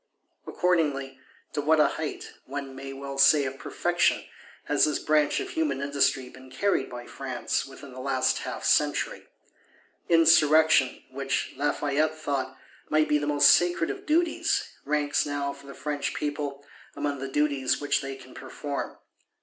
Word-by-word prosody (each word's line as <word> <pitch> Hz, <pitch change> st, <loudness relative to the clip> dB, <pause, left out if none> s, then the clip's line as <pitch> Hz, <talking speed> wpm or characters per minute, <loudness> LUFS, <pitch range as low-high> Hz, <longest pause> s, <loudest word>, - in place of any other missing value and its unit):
Accordingly, 145 Hz, -7 st, 0 dB, 0.3 s
to 145 Hz, -, -1 dB
what 155 Hz, +2 st, +3 dB
a -, -, +5 dB
height, 155 Hz, -2 st, -5 dB
one 135 Hz, 0 st, -5 dB
may 135 Hz, +1 st, -7 dB
well 135 Hz, 0 st, -7 dB
say 140 Hz, +1 st, +6 dB
of 135 Hz, 0 st, -5 dB
perfection, -, -, +1 dB, 0.4 s
has -, -, +3 dB
this 150 Hz, -, 0 dB
branch 150 Hz, -1 st, +2 dB
of -, -, -5 dB
human 150 Hz, -4 st, -1 dB
industry 140 Hz, -2 st, +1 dB
been 130 Hz, +1 st, -14 dB
carried 135 Hz, +1 st, 0 dB
by 120 Hz, -1 st, -8 dB
France, 130 Hz, -1 st, -3 dB
within 135 Hz, 0 st, -12 dB
the 130 Hz, -, -9 dB
last 130 Hz, 0 st, +1 dB
half -, -, -6 dB
century! -, -, +1 dB, 0.8 s
Insurrection, 160 Hz, -4 st, +5 dB
which, 135 Hz, 0 st, -2 dB
Lafayette 145 Hz, +2 st, 0 dB
thought, 140 Hz, -3 st, -3 dB, 0.3 s
might 155 Hz, 0 st, +3 dB
be 150 Hz, -, +3 dB
"the 145 Hz, -, -3 dB
most 145 Hz, -1 st, +6 dB
sacred 175 Hz, -1 st, +2 dB
of -, -, -9 dB
duties," 330 Hz, +2 st, +1 dB, 0.2 s
ranks 145 Hz, 0 st, +1 dB
now, 140 Hz, -1 st, -2 dB
for 140 Hz, 0 st, -15 dB
the 140 Hz, -, -10 dB
French 145 Hz, -2 st, -3 dB
people, 145 Hz, -1 st, -4 dB, 0.3 s
among 145 Hz, -1 st, -2 dB
the 135 Hz, -, -4 dB
duties 140 Hz, -2 st, +1 dB
which 145 Hz, -, 0 dB
they 135 Hz, -1 st, -5 dB
can 130 Hz, -1 st, -14 dB
perform. 145 Hz, -2 st, -6 dB
145 Hz, 155 wpm, -27 LUFS, 135-150 Hz, 0.8 s, say